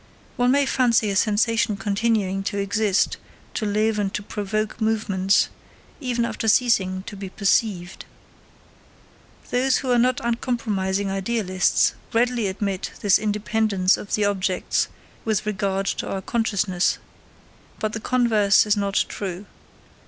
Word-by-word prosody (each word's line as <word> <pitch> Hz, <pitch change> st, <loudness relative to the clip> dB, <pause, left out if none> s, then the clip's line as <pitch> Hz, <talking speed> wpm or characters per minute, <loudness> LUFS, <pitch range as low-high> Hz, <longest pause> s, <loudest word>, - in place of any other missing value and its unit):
One 245 Hz, 0 st, +2 dB
may 280 Hz, +2 st, +3 dB
fancy 235 Hz, -5 st, +2 dB
a -, -, -2 dB
sensation 220 Hz, +1 st, +2 dB
continuing 200 Hz, -1 st, 0 dB
to 205 Hz, -, -2 dB
exist, 200 Hz, 0 st, +1 dB, 0.4 s
to 215 Hz, -, -2 dB
live 215 Hz, +1 st, +1 dB
and 200 Hz, -2 st, -1 dB
to 210 Hz, -, -3 dB
provoke 210 Hz, +2 st, -3 dB
movements, 205 Hz, -3 st, +2 dB, 0.5 s
even 245 Hz, -4 st, -1 dB
after 230 Hz, -1 st, -3 dB
ceasing 195 Hz, -5 st, +2 dB
to 205 Hz, -, -8 dB
be 195 Hz, -1 st, -7 dB
perceived. 195 Hz, -2 st, 0 dB, 1.5 s
Those 255 Hz, +1 st, +2 dB
who 260 Hz, -, -2 dB
are 245 Hz, -, +4 dB
not 250 Hz, +1 st, +2 dB
uncompromising 210 Hz, -5 st, -1 dB
idealists 195 Hz, -2 st, +1 dB, 0.2 s
readily 235 Hz, -1 st, +1 dB
admit 195 Hz, 0 st, -3 dB
this 200 Hz, -2 st, +4 dB
independence 210 Hz, -2 st, +1 dB
of 205 Hz, -, -3 dB
the 210 Hz, -, +1 dB
objects 190 Hz, -2 st, 0 dB, 0.4 s
with 220 Hz, -3 st, 0 dB
regard 195 Hz, -2 st, -1 dB
to -, -, -2 dB
our 190 Hz, -1 st, -3 dB
consciousness, 200 Hz, -5 st, 0 dB, 0.8 s
but 215 Hz, 0 st, -2 dB
the 220 Hz, -, -3 dB
converse 220 Hz, -5 st, +3 dB
is 210 Hz, 0 st, +2 dB
not 200 Hz, -1 st, +1 dB
true. 190 Hz, -1 st, -5 dB
210 Hz, 130 wpm, -23 LUFS, 195-230 Hz, 1.5 s, are